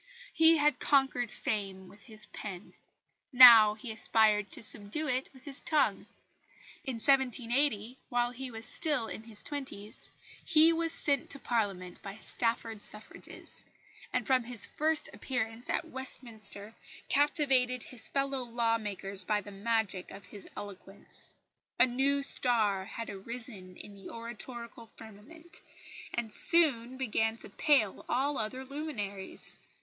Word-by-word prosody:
He 325 Hz, 0 st, +5 dB
had 295 Hz, 0 st, +2 dB
conquered 270 Hz, -4 st, +2 dB
fame 195 Hz, -3 st, -4 dB
with 205 Hz, +2 st, -16 dB
his 215 Hz, -2 st, -9 dB
pen; 195 Hz, -3 st, -9 dB, 0.6 s
now 230 Hz, -5 st, +9 dB
he 220 Hz, +2 st, -7 dB
aspired 215 Hz, -2 st, +2 dB
to -, -, -7 dB
subdue 215 Hz, +9 st, +1 dB
it 255 Hz, -1 st, -1 dB
with 260 Hz, -2 st, -18 dB
his 280 Hz, -1 st, -8 dB
tongue. 305 Hz, -2 st, 0 dB, 0.8 s
In 265 Hz, -3 st, -4 dB
1780, 250 Hz, -2 st, +1 dB
while 240 Hz, 0 st, 0 dB
he 260 Hz, +1 st, -7 dB
was 225 Hz, -1 st, -8 dB
still 295 Hz, -8 st, 0 dB
in 220 Hz, -, -7 dB
the 220 Hz, -, -13 dB
twenties, 220 Hz, -4 st, -5 dB, 0.3 s
he 325 Hz, +1 st, +5 dB
was 330 Hz, 0 st, -1 dB
sent 285 Hz, -4 st, 0 dB
to 280 Hz, -, -7 dB
Parliament 200 Hz, -8 st, -3 dB
by 195 Hz, 0 st, -7 dB
Stafford 230 Hz, -1 st, -2 dB
suffrages; 210 Hz, +1 st, -8 dB, 0.5 s
and -, -, -1 dB
from 260 Hz, -3 st, +2 dB
his 240 Hz, -3 st, +2 dB
first 310 Hz, 0 st, +1 dB
appearance 230 Hz, -2 st, -4 dB
at -, -, -1 dB
Westminster 225 Hz, -5 st, -3 dB, 0.3 s
captivated 270 Hz, -4 st, +2 dB
his 250 Hz, -3 st, -1 dB
fellow 275 Hz, -1 st, -1 dB
law 230 Hz, -1 st, -1 dB
makers 200 Hz, -2 st, -4 dB
by 210 Hz, +3 st, 0 dB
the 205 Hz, 0 st, -10 dB
magic 200 Hz, -2 st, -2 dB
of 195 Hz, +1 st, -11 dB
his 205 Hz, -, -12 dB
eloquence. 200 Hz, -1 st, -7 dB, 0.4 s
A -, -, +7 dB
new 275 Hz, +3 st, 0 dB
star 215 Hz, -8 st, +4 dB
had 230 Hz, +2 st, -7 dB
arisen 200 Hz, -2 st, -8 dB
in 205 Hz, -, -11 dB
the 195 Hz, -1 st, -12 dB
oratorical 235 Hz, 0 st, -9 dB
firmament, 230 Hz, +11 st, -14 dB, 0.5 s
and 230 Hz, -3 st, -3 dB
soon 260 Hz, -7 st, +7 dB
began 225 Hz, -3 st, -1 dB
to -, -, -8 dB
pale 270 Hz, -, +1 dB
all 280 Hz, +2 st, 0 dB
other 255 Hz, +5 st, -4 dB
luminaries. 240 Hz, -10 st, -6 dB
235 Hz, 135 wpm, -30 LUFS, 210-270 Hz, 0.8 s, now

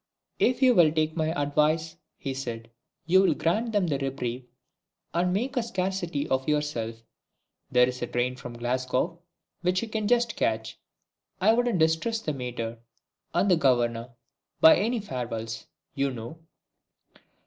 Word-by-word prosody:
"If 255 Hz, +2 st, +2 dB
you 255 Hz, -1 st, +7 dB
will 170 Hz, -7 st, +6 dB
take 155 Hz, 0 st, 0 dB
my 160 Hz, -2 st, 0 dB
advice," 155 Hz, +3 st, +1 dB, 0.2 s
he 135 Hz, -, -4 dB
said, 115 Hz, -3 st, -6 dB, 0.3 s
"you 190 Hz, +2 st, +5 dB
will 195 Hz, -, +3 dB
grant 220 Hz, +8 st, 0 dB
them 205 Hz, -4 st, +2 dB
a 135 Hz, -, -1 dB
reprieve, 130 Hz, -2 st, -3 dB, 0.7 s
and 175 Hz, +2 st, +1 dB
make 245 Hz, +9 st, -1 dB
a 245 Hz, -, +2 dB
scarcity 185 Hz, -8 st, -2 dB
of 130 Hz, +2 st, 0 dB
yourself. 120 Hz, -7 st, -2 dB, 0.7 s
There 125 Hz, 0 st, +5 dB
is 125 Hz, 0 st, -5 dB
a 120 Hz, -, -1 dB
train 125 Hz, +1 st, -1 dB
for 130 Hz, -, -8 dB
Glasgow 125 Hz, +6 st, -1 dB, 0.4 s
which 180 Hz, +3 st, +1 dB
you -, -, -4 dB
can 215 Hz, -1 st, -2 dB
just 240 Hz, 0 st, +2 dB
catch. 110 Hz, 0 st, -1 dB, 0.6 s
I 210 Hz, +4 st, +5 dB
wouldn't 240 Hz, -3 st, +1 dB
distress 160 Hz, +8 st, +2 dB
the 155 Hz, -8 st, -3 dB
Mater 120 Hz, -3 st, -5 dB, 0.6 s
and 180 Hz, -2 st, +3 dB
Governor 120 Hz, -3 st, +2 dB, 0.5 s
by 160 Hz, -, +9 dB
any 230 Hz, +4 st, 0 dB
farewells, 115 Hz, -, -5 dB, 0.3 s
you 140 Hz, 0 st, 0 dB
know." 120 Hz, +5 st, -7 dB
150 Hz, 150 wpm, -27 LUFS, 125-190 Hz, 0.7 s, by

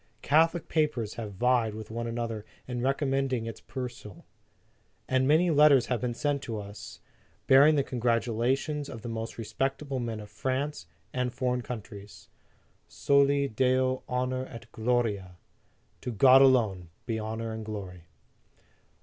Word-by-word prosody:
Catholic 165 Hz, +3 st, +3 dB
papers 150 Hz, -9 st, 0 dB
have 110 Hz, -3 st, -6 dB
vied 115 Hz, +1 st, +1 dB
with 110 Hz, 0 st, -8 dB
one 115 Hz, +1 st, -3 dB
another 115 Hz, -2 st, -3 dB, 0.2 s
in 125 Hz, -1 st, -3 dB
recom 135 Hz, +2 st, 0 dB
mending 135 Hz, -3 st, 0 dB
its 115 Hz, -1 st, -7 dB
perusal, 125 Hz, -6 st, -8 dB, 0.8 s
and 130 Hz, 0 st, +2 dB
many 165 Hz, +4 st, +4 dB
letters 145 Hz, -4 st, +6 dB
have 120 Hz, -, -2 dB
been 120 Hz, -1 st, -2 dB
sent 145 Hz, +1 st, -1 dB
to 115 Hz, -5 st, -4 dB
us, 100 Hz, 0 st, -10 dB, 0.4 s
bearing 140 Hz, +4 st, +6 dB
the 140 Hz, -, +2 dB
congratulations 125 Hz, +4 st, 0 dB
of 115 Hz, -, -9 dB
the -, -, -5 dB
most 115 Hz, 0 st, -5 dB
respectable 135 Hz, +5 st, -2 dB
men 115 Hz, -3 st, -3 dB
of 105 Hz, -1 st, -10 dB
France 130 Hz, -, -3 dB, 0.3 s
and 125 Hz, -1 st, -1 dB
foreign 125 Hz, 0 st, -1 dB
countries: 105 Hz, -4 st, -9 dB, 0.6 s
Soli 140 Hz, 0 st, +2 dB
Deo 130 Hz, +2 st, +1 dB
honor 130 Hz, +1 st, -1 dB
et 115 Hz, 0 st, -10 dB
gloria, 110 Hz, -6 st, -1 dB, 0.6 s
to 125 Hz, -, -4 dB
God 130 Hz, +4 st, +7 dB
alone 110 Hz, -10 st, +3 dB, 0.2 s
be 115 Hz, -2 st, -2 dB
honor 110 Hz, +1 st, -4 dB
and 110 Hz, 0 st, -5 dB
glory. 95 Hz, -5 st, -7 dB
125 Hz, 140 wpm, -28 LUFS, 110-135 Hz, 0.8 s, God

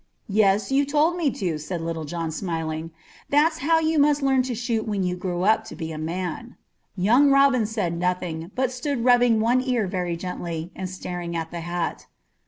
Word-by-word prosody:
"Yes, 205 Hz, +1 st, +3 dB
you 275 Hz, +1 st, +4 dB
told 300 Hz, +4 st, +2 dB
me 335 Hz, -5 st, +1 dB
to," 175 Hz, -, -2 dB
said 170 Hz, +3 st, -4 dB
Little 165 Hz, -1 st, -4 dB
John, 165 Hz, +1 st, -3 dB
smiling. 160 Hz, -2 st, -3 dB, 0.4 s
"That's 315 Hz, +3 st, +3 dB
how 325 Hz, +2 st, +3 dB
you 320 Hz, -1 st, +1 dB
must 290 Hz, 0 st, +3 dB
learn 265 Hz, -1 st, +3 dB
to 245 Hz, -, -2 dB
shoot 230 Hz, -1 st, -2 dB
when 205 Hz, -3 st, -1 dB
you 180 Hz, 0 st, -1 dB
grow 180 Hz, -1 st, -3 dB
up 220 Hz, +2 st, +3 dB
to 220 Hz, -, -9 dB
be 160 Hz, -2 st, -5 dB
a 155 Hz, -, -6 dB
man." 180 Hz, +8 st, -4 dB, 0.4 s
Young 240 Hz, +10 st, +5 dB
Robin 275 Hz, -5 st, +4 dB
said 190 Hz, -7 st, -2 dB
nothing, 175 Hz, -2 st, -2 dB
but 260 Hz, -1 st, 0 dB
stood 255 Hz, -1 st, -2 dB
rubbing 245 Hz, -2 st, +5 dB
one 240 Hz, +3 st, +3 dB
ear 250 Hz, -4 st, 0 dB
very 180 Hz, -2 st, -2 dB
gently, 170 Hz, -1 st, -5 dB
and 185 Hz, -1 st, -4 dB
staring 175 Hz, -2 st, -5 dB
at 165 Hz, -1 st, -3 dB
the 170 Hz, -1 st, -5 dB
hat. 175 Hz, 0 st, -3 dB
195 Hz, 190 wpm, -24 LUFS, 170-255 Hz, 0.4 s, Young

